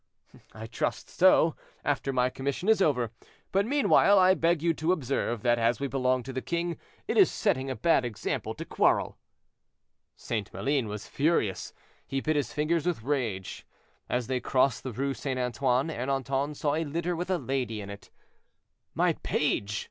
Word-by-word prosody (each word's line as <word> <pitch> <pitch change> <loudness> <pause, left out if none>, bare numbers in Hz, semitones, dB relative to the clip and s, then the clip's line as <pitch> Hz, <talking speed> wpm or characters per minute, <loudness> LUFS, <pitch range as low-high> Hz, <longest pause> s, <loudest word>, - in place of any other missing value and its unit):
"I 110 0 -9
trust 115 - -3
so, 175 -3 +4 0.3
after 140 -1 0
my 125 -1 +1
commission 140 +8 -3
is 220 -2 +4
over; 125 - +2 0.4
but, 195 +2 +2
meanwhile, 255 -7 +4
I 185 0 +6
beg 165 -2 +1
you 170 -1 +3
to 160 +2 0
observe 130 - -1
that 120 -1 +3
as 115 +1 +2
we 140 - -2
belong 130 -2 0
to 130 - -7
the 130 - -3
king, 170 +2 -2 0.3
it - - -1
is 390 - +7
setting 135 - 0
a 130 - -2
bad 135 +4 +3
example 120 -4 -3
to - - -7
quarrel." - - +1 1.0
St. 105 -3 -4
Maline 135 -4 -1
was 105 0 -6
furious, 140 - 0 0.4
he 135 - -1
bit 155 +3 0
his 145 -2 -1
fingers 155 +2 0
with 165 -11 -1
rage. 115 -9 -2 0.5
As 125 -1 0
they 130 +2 -1
crossed 130 -1 +1
the 130 - -5
Rue 135 +4 -2
St. 135 -1 -4
Antoine, 125 +3 0
Ernanton 135 +2 -2
saw 145 0 0
a 160 +2 0
litter 170 +3 -2
with 175 +2 -4
a 185 - +2
lady 130 -6 -2
in 100 -1 -7
it. 100 - -11 0.9
"My - - +3
page!" 105 +1 0
135 Hz, 175 wpm, -28 LUFS, 125-165 Hz, 1.0 s, is